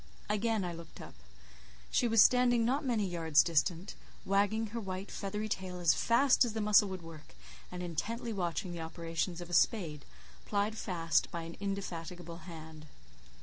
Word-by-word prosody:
Again 210 Hz, -1 st, +1 dB
I 175 Hz, -, -3 dB
looked 165 Hz, -1 st, -11 dB
up. -, -, -10 dB, 0.8 s
She 240 Hz, -, +3 dB
was 225 Hz, -2 st, +7 dB
standing 245 Hz, -2 st, +4 dB
not 270 Hz, +6 st, +1 dB
many 235 Hz, -6 st, +1 dB
yards 165 Hz, -4 st, +3 dB
distant, 170 Hz, +3 st, 0 dB, 0.3 s
wagging 205 Hz, +3 st, +2 dB
her 235 Hz, -, -2 dB
white 190 Hz, -1 st, -5 dB
feathery 210 Hz, +2 st, -3 dB
tail 185 Hz, -3 st, -4 dB
as 170 Hz, -4 st, +4 dB
fast 255 Hz, -, +4 dB
as 235 Hz, -3 st, -2 dB
the 220 Hz, -, -3 dB
muscle 210 Hz, -1 st, +5 dB
would 185 Hz, -2 st, -6 dB
work, 160 Hz, -, -12 dB, 0.4 s
and 180 Hz, 0 st, -5 dB
intently 225 Hz, +8 st, -3 dB
watching 180 Hz, 0 st, -2 dB
the 170 Hz, -1 st, -5 dB
operations 165 Hz, +2 st, -3 dB
of 175 Hz, -, -8 dB
a -, -, -6 dB
spade, 165 Hz, -6 st, +2 dB, 0.4 s
plied 205 Hz, +1 st, -1 dB
fast 165 Hz, -7 st, 0 dB
by 170 Hz, -1 st, -5 dB
an 165 Hz, +1 st, -8 dB
indefatigable 175 Hz, -4 st, -5 dB
hand. 160 Hz, -1 st, -10 dB
185 Hz, 165 wpm, -32 LUFS, 165-215 Hz, 0.8 s, was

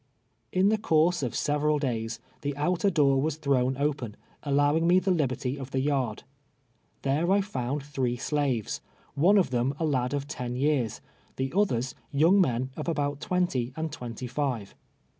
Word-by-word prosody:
In 190 Hz, +2 st, +3 dB
the 215 Hz, 0 st, +2 dB
course 170 Hz, -3 st, +3 dB
of 125 Hz, -4 st, -2 dB
several 150 Hz, 0 st, +1 dB
days 120 Hz, -5 st, -2 dB, 0.2 s
the 145 Hz, -1 st, -3 dB
outer 180 Hz, +6 st, +1 dB
door 140 Hz, -6 st, +3 dB
was 155 Hz, 0 st, 0 dB
thrown 130 Hz, -4 st, +1 dB
open, 140 Hz, -7 st, -2 dB, 0.2 s
allowing 145 Hz, +3 st, +2 dB
me 180 Hz, +1 st, +6 dB
the 185 Hz, +1 st, +2 dB
liberty 135 Hz, -4 st, -1 dB
of 135 Hz, -1 st, -6 dB
the 135 Hz, -, -1 dB
yard. 130 Hz, -5 st, 0 dB, 0.8 s
There 150 Hz, +6 st, +1 dB
I 195 Hz, -, +5 dB
f 200 Hz, 0 st, -3 dB
nuul 135 Hz, +3 st, -2 dB
three 135 Hz, -4 st, -1 dB
slaves' 130 Hz, -4 st, -1 dB, 0.2 s
— -, -, -33 dB
one 205 Hz, +2 st, +6 dB
of 185 Hz, -8 st, +2 dB
them 125 Hz, +3 st, 0 dB
a 165 Hz, -, +1 dB
lad 130 Hz, -3 st, 0 dB
often 130 Hz, -4 st, -4 dB
years, 130 Hz, -4 st, 0 dB, 0.3 s
the 135 Hz, +2 st, -2 dB
others 130 Hz, -, +1 dB, 0.2 s
younsj 165 Hz, +8 st, +5 dB
men 130 Hz, -6 st, +1 dB
of -, -, -5 dB
al)out 145 Hz, -3 st, -1 dB
twenty 140 Hz, -10 st, 0 dB
and 160 Hz, 0 st, -3 dB
twenty 125 Hz, 0 st, -6 dB
live. 125 Hz, -5 st, -2 dB
140 Hz, 170 wpm, -28 LUFS, 125-160 Hz, 0.8 s, me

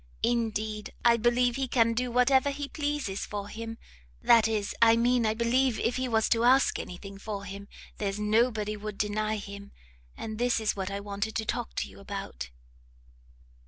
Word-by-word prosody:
indeed 220 Hz, -2 st, -1 dB
I 235 Hz, 0 st, +7 dB
believe 240 Hz, +2 st, +2 dB
he 270 Hz, -1 st, -1 dB
can 230 Hz, -2 st, +3 dB
do 250 Hz, +2 st, -1 dB
whatever 260 Hz, +3 st, +4 dB
he 280 Hz, 0 st, -4 dB
pleases 290 Hz, -10 st, -2 dB
for 205 Hz, -1 st, -5 dB
him, 225 Hz, +1 st, -6 dB, 0.4 s
that 230 Hz, -, +5 dB
is 210 Hz, -2 st, -1 dB
I 230 Hz, 0 st, +7 dB
mean 240 Hz, 0 st, +3 dB
I 215 Hz, -, +1 dB
believe 240 Hz, +2 st, +2 dB
if 240 Hz, +2 st, 0 dB
he 255 Hz, 0 st, -1 dB
was 220 Hz, -2 st, +2 dB
to 230 Hz, 0 st, +2 dB
ask 260 Hz, +3 st, +4 dB
any 180 Hz, -, -6 dB
thing 195 Hz, +1 st, -10 dB
for 200 Hz, -1 st, -5 dB
him, 200 Hz, +1 st, -8 dB, 0.3 s
there's 200 Hz, 0 st, -2 dB
nobody 215 Hz, 0 st, +1 dB
would 210 Hz, -1 st, -6 dB
deny 215 Hz, +1 st, 0 dB
him. 200 Hz, 0 st, -9 dB, 0.5 s
And 220 Hz, -1 st, -6 dB
this 245 Hz, -1 st, +2 dB
is 220 Hz, -2 st, 0 dB
what 190 Hz, -1 st, -3 dB
I 200 Hz, 0 st, -3 dB
wanted 205 Hz, +2 st, -4 dB
to 220 Hz, -, -1 dB
talk -, -, -3 dB
to -, -, -1 dB
you -, -, -14 dB
about." -, -, -6 dB
220 Hz, 185 wpm, -28 LUFS, 205-240 Hz, 0.5 s, I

